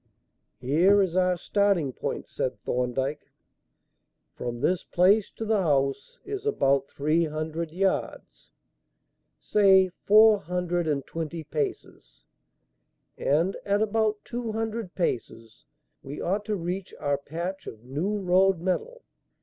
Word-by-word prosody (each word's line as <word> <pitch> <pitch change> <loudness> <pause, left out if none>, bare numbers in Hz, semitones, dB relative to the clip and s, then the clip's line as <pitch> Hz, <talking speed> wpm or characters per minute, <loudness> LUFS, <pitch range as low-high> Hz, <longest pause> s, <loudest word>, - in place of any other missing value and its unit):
"Here 165 +11 +4
is 180 -2 -3
our 180 -1 +2
starting 195 -8 +1
point," - - -4
said 125 -3 -3
Thorndyke. 125 +6 -2 1.0
"From 120 -1 -5
this 180 -1 +1
place 195 +4 +3
to 225 - -5
the 215 -2 +2
house 140 -5 0
is 405 0 -5
about 140 - +2
three 155 +4 +1
hundred 155 +2 -4
yards 190 +3 -2 0.9
say 190 -2 +4
four 215 +3 +5
hundred 175 -2 -2
and 140 -3 -1
twenty 165 0 -5
paces 145 - -5 0.9
and 165 +7 +1
at 205 +1 +1
about 215 0 0
two 235 -2 -4
hundred 225 -3 -4
paces 115 - -4 0.4
we 140 +2 -8
ought 200 +4 -1
to 215 - -1
reach 180 +1 -5
our 145 -1 0
patch 170 +6 -6
of 110 0 -9
new 155 +12 -2
road 190 0 +3
metal. 450 - -3
180 Hz, 125 wpm, -26 LUFS, 145-200 Hz, 1.0 s, four